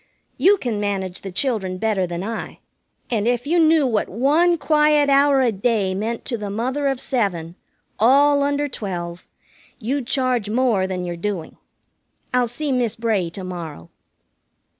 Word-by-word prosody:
"You 405 Hz, +2 st, +5 dB
can 235 Hz, -, -3 dB
manage 195 Hz, -3 st, -3 dB
the 195 Hz, -, -7 dB
children 190 Hz, -4 st, -1 dB
better 200 Hz, -3 st, 0 dB
than 175 Hz, +1 st, -4 dB
I, 225 Hz, +2 st, -5 dB, 0.5 s
and 220 Hz, -2 st, 0 dB
if 245 Hz, +1 st, 0 dB
you 340 Hz, +4 st, +2 dB
knew 320 Hz, -2 st, +4 dB
what 225 Hz, -5 st, 0 dB
one 305 Hz, -, +3 dB
quiet 300 Hz, -2 st, +3 dB
hour 275 Hz, 0 st, +4 dB
a 245 Hz, -3 st, +3 dB
day 205 Hz, -2 st, 0 dB
meant 220 Hz, +4 st, -3 dB
to 235 Hz, -5 st, -3 dB
the 205 Hz, -1 st, -4 dB
mother 260 Hz, +7 st, -1 dB
of 270 Hz, -2 st, -1 dB
seven, 185 Hz, -12 st, -2 dB, 0.5 s
all 285 Hz, +5 st, +5 dB
under 285 Hz, +1 st, 0 dB
twelve, 175 Hz, -8 st, -6 dB, 0.5 s
you'd 255 Hz, +2 st, -3 dB
charge 255 Hz, -5 st, 0 dB
more 225 Hz, -5 st, +1 dB
than 180 Hz, -1 st, -3 dB
you're 175 Hz, -1 st, -4 dB
doing. 175 Hz, -1 st, -4 dB, 0.8 s
I'll 250 Hz, -1 st, +3 dB
see 280 Hz, +5 st, -2 dB
Miss 245 Hz, -4 st, 0 dB
Bray 220 Hz, -6 st, 0 dB
to 185 Hz, +3 st, -8 dB
morrow." 165 Hz, -, -7 dB
230 Hz, 160 wpm, -21 LUFS, 190-275 Hz, 0.8 s, You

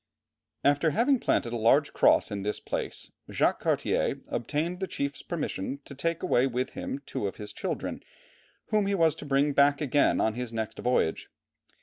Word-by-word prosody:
After 145 Hz, +3 st, +3 dB
having 245 Hz, -, +2 dB
planted 120 Hz, -, 0 dB
a -, -, -1 dB
large 135 Hz, +6 st, +3 dB
cross -, -, +4 dB
in 100 Hz, -1 st, -3 dB
this 105 Hz, +2 st, -2 dB
place, -, -, -5 dB, 0.2 s
Jacques -, -, +1 dB
Cartier -, -, 0 dB
obtained 155 Hz, +8 st, -2 dB
the 190 Hz, -, -2 dB
chief's 140 Hz, -4 st, -3 dB
permission 140 Hz, -, -3 dB
to -, -, -9 dB
take 165 Hz, +4 st, -2 dB
away 125 Hz, +2 st, +3 dB
with 125 Hz, 0 st, -2 dB
him 140 Hz, +1 st, -5 dB
two 100 Hz, -, -3 dB
of 95 Hz, -, -5 dB
his 105 Hz, -1 st, -8 dB
children, -, -, -4 dB, 0.7 s
whom 210 Hz, -2 st, +2 dB
he 200 Hz, -, +1 dB
was 165 Hz, -4 st, +4 dB
to 150 Hz, -, -8 dB
bring 140 Hz, +1 st, +2 dB
back 140 Hz, +1 st, +4 dB
again 145 Hz, -1 st, +2 dB
on 110 Hz, -, +2 dB
his 125 Hz, 0 st, -4 dB
next 110 Hz, -1 st, -4 dB
voyage. 125 Hz, -10 st, 0 dB
140 Hz, 180 wpm, -28 LUFS, 120-160 Hz, 0.7 s, cross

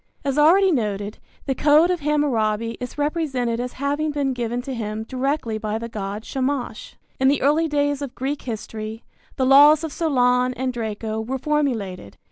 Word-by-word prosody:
As 275 Hz, -1 st, 0 dB
already 360 Hz, +6 st, +5 dB
noted, 210 Hz, -, -2 dB, 0.3 s
the 270 Hz, -, 0 dB
code 300 Hz, +6 st, +4 dB
of 360 Hz, -, -1 dB
Hammurabi 230 Hz, -7 st, 0 dB
is 250 Hz, +2 st, -7 dB
represented 285 Hz, -6 st, -1 dB
as 250 Hz, 0 st, -4 dB
having 290 Hz, +3 st, -1 dB
been 285 Hz, -2 st, -1 dB
given 240 Hz, -1 st, -2 dB
to 265 Hz, -, -5 dB
him 215 Hz, -2 st, -4 dB
directly 255 Hz, -2 st, -2 dB
by 215 Hz, 0 st, -2 dB
the 230 Hz, +1 st, -5 dB
god 205 Hz, 0 st, -5 dB
Shamash. 265 Hz, -4 st, -3 dB, 0.2 s
In 265 Hz, -, +3 dB
the 280 Hz, 0 st, +2 dB
early 305 Hz, +4 st, +3 dB
days 290 Hz, -1 st, 0 dB
of 275 Hz, -3 st, -6 dB
Greek 275 Hz, +3 st, -3 dB
history, 220 Hz, -1 st, -6 dB, 0.3 s
the 260 Hz, -, +1 dB
laws 290 Hz, +4 st, +7 dB
of 320 Hz, -3 st, -4 dB
Solon 250 Hz, -5 st, +2 dB
and 255 Hz, 0 st, -2 dB
Draco 220 Hz, -1 st, -3 dB
were 255 Hz, +4 st, -3 dB
formulated. 245 Hz, -, -2 dB
260 Hz, 170 wpm, -22 LUFS, 225-290 Hz, 0.3 s, laws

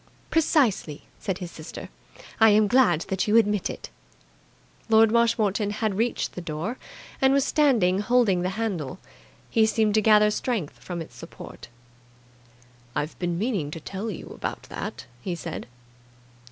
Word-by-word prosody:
"Precisely," 255 Hz, -, +2 dB, 0.2 s
said 190 Hz, -2 st, -2 dB
his 175 Hz, -2 st, -7 dB
sister. 155 Hz, +1 st, -9 dB, 0.5 s
"I 225 Hz, -1 st, +7 dB
am 210 Hz, +1 st, +5 dB
glad 205 Hz, -7 st, +4 dB
that 190 Hz, +1 st, 0 dB
you 215 Hz, +2 st, +5 dB
admit 210 Hz, -3 st, +2 dB
it." -, -, -8 dB, 1.0 s
Lord 220 Hz, 0 st, +6 dB
Marshmoreton 220 Hz, -3 st, +2 dB
had 215 Hz, 0 st, -1 dB
reached 230 Hz, +5 st, -1 dB
the 180 Hz, -, -6 dB
door, 170 Hz, +9 st, -4 dB, 0.4 s
and 265 Hz, 0 st, +5 dB
was 275 Hz, -1 st, +3 dB
standing 230 Hz, -, +3 dB
holding 210 Hz, -4 st, +3 dB
the 180 Hz, -, 0 dB
handle. 185 Hz, -8 st, -2 dB, 0.5 s
He 220 Hz, -2 st, +4 dB
seemed 220 Hz, -1 st, +2 dB
to 215 Hz, -, +4 dB
gather 210 Hz, 0 st, +5 dB
strength 210 Hz, -, -2 dB
from 175 Hz, -2 st, -5 dB
its -, -, -16 dB
support. -, -, -11 dB, 1.3 s
"I've 150 Hz, +2 st, -3 dB
been 175 Hz, -1 st, -1 dB
meaning 200 Hz, -, -1 dB
to 155 Hz, -, -6 dB
tell 200 Hz, +7 st, -5 dB
you 200 Hz, -, -7 dB
about -, -, -5 dB
that," -, -, -6 dB, 0.2 s
he 180 Hz, +4 st, -3 dB
said. 170 Hz, -1 st, -6 dB
210 Hz, 150 wpm, -25 LUFS, 180-225 Hz, 1.3 s, I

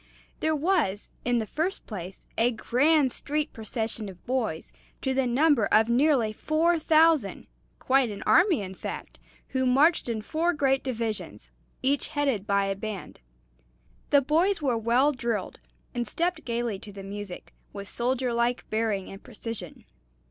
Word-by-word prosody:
There 315 Hz, 0 st, +1 dB
was, 300 Hz, -, 0 dB
in 245 Hz, 0 st, +2 dB
the 225 Hz, -, 0 dB
first 320 Hz, -, -2 dB
place, 190 Hz, -3 st, -8 dB
a 230 Hz, +2 st, +3 dB
grand 265 Hz, +4 st, +2 dB
street 300 Hz, +4 st, -2 dB
procession 220 Hz, -1 st, -4 dB
of 180 Hz, -2 st, -14 dB
boys, 235 Hz, -11 st, -2 dB, 0.3 s
to 265 Hz, -, +1 dB
the 265 Hz, -1 st, +1 dB
number 265 Hz, -2 st, +3 dB
of 220 Hz, +2 st, +4 dB
nearly 245 Hz, -3 st, +3 dB
four 325 Hz, +7 st, +1 dB
thousand 310 Hz, -, +3 dB, 0.3 s
quite 265 Hz, -2 st, +2 dB
an 205 Hz, -1 st, -6 dB
army, 350 Hz, -, +4 dB
in 190 Hz, 0 st, -6 dB
fact -, -, -7 dB, 0.3 s
who 260 Hz, -1 st, 0 dB
marched 275 Hz, +4 st, +3 dB
in 220 Hz, -2 st, -2 dB
four 330 Hz, +7 st, 0 dB
great 270 Hz, -3 st, +1 dB
divisions, 230 Hz, -4 st, -4 dB, 0.3 s
each 275 Hz, +2 st, +1 dB
headed 275 Hz, -9 st, -1 dB
by 200 Hz, 0 st, +2 dB
a 195 Hz, 0 st, -1 dB
band. 205 Hz, -1 st, -6 dB, 0.9 s
The 285 Hz, -1 st, +5 dB
boys 335 Hz, +8 st, +2 dB
were 270 Hz, -6 st, +1 dB
well 235 Hz, +6 st, +3 dB
drilled, 235 Hz, -7 st, -3 dB, 0.3 s
and 240 Hz, -2 st, -1 dB
stepped 340 Hz, +6 st, -1 dB
gayly 235 Hz, -4 st, -2 dB
to 205 Hz, -, -10 dB
the 195 Hz, -1 st, -9 dB
music, 200 Hz, -1 st, -8 dB, 0.2 s
with 200 Hz, -1 st, -7 dB
soldier 250 Hz, +1 st, -1 dB
like 235 Hz, +1 st, 0 dB
bearing 215 Hz, -3 st, 0 dB
and 195 Hz, -, -10 dB
precision. 215 Hz, -6 st, -7 dB
245 Hz, 155 wpm, -27 LUFS, 215-295 Hz, 0.9 s, The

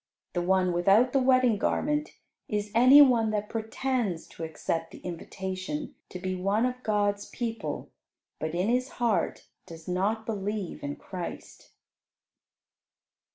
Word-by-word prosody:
The 175 Hz, -, 0 dB
one 185 Hz, 0 st, +2 dB
without 200 Hz, +8 st, +4 dB
the 270 Hz, -, +4 dB
wedding 255 Hz, -4 st, +4 dB
garment 300 Hz, -, 0 dB, 0.3 s
is 210 Hz, -1 st, -2 dB
any 255 Hz, +5 st, +9 dB
one 235 Hz, -5 st, +3 dB
that 210 Hz, -1 st, -2 dB
pretends 225 Hz, -5 st, -2 dB
to 165 Hz, -, -8 dB
accept 165 Hz, +1 st, -3 dB
the -, -, -12 dB
invitation 190 Hz, -, -5 dB, 0.2 s
to -, -, -6 dB
be 185 Hz, +1 st, -3 dB
one 195 Hz, +5 st, +1 dB
of 250 Hz, 0 st, -3 dB
God's 205 Hz, -2 st, 0 dB
people, 230 Hz, -2 st, -4 dB, 0.5 s
but 155 Hz, +1 st, -3 dB
in 180 Hz, +3 st, +1 dB
his 250 Hz, +2 st, 0 dB
heart 225 Hz, -8 st, 0 dB, 0.2 s
does 165 Hz, -2 st, -11 dB
not 200 Hz, +5 st, 0 dB
believe 205 Hz, -3 st, -3 dB
in 145 Hz, 0 st, -4 dB
Christ. 180 Hz, -3 st, -8 dB
205 Hz, 135 wpm, -28 LUFS, 185-245 Hz, 0.5 s, any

